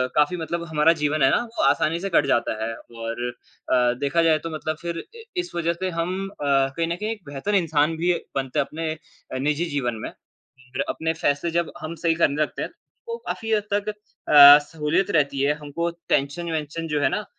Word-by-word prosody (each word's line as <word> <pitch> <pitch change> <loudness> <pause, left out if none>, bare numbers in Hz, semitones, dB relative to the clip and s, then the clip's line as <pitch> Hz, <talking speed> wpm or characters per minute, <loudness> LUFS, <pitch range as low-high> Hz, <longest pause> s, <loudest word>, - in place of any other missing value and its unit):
काफ़ी 150 +5 +3
मतलब 170 +1 -3
हमारा 155 +1 +4
जीवन 150 -1 -1
है 135 - +6
ना, - - +4
वो 230 -1 -4
आसानी 165 +2 +2
से 195 +2 -3
कट 145 - +5
जाता 120 - +2
है। 115 +1 -2
और 115 0 -7
अ, 125 0 -1
देखा 145 +4 +1
जाए 160 -1 +4
तो 165 - -6
मतलब 155 0 -3
फिर 170 -1 -4 0.2
इ 460 - -10
इस 355 0 -2
वज़ह 170 0 +1
से 185 +2 -3
हम 180 +3 -2
अ, - - -18
कहीं 140 +3 +1
न 170 - -1
कहीं 210 +4 -4
एक 215 -3 -6
बेहतर 145 +9 -2
इंसान 160 -3 +2
भी 175 +2 +2 0.2
बनते 135 -1 -1
अपने 160 +3 -2
अ, 155 -4 -11
निजी 150 +5 0
जीवन 125 -5 -1
में। - - -3
अगर 130 -1 -10
अपने 160 0 -1
फैसले 145 +4 +1
जब 170 0 0
हम 160 +2 -5
सही 165 -1 +3
करने 150 -3 +2
लगते 150 - -2
हैं, - - -3
तो 465 0 -10
काफ़ी 225 0 -3
हद 210 -1 +2
तक 205 +1 0
अ, 150 -9 +7
सहूलियत 165 +6 -1
रहती 140 -3 +1
है 140 +1 +3
हमको, 170 +4 -2 0.2
टेंशन-वेंशन 160 +2 -1
जो 150 -1 -1
है - - +3
ना, 210 - -2
160 Hz, 205 wpm, -24 LUFS, 145-170 Hz, 0.2 s, अ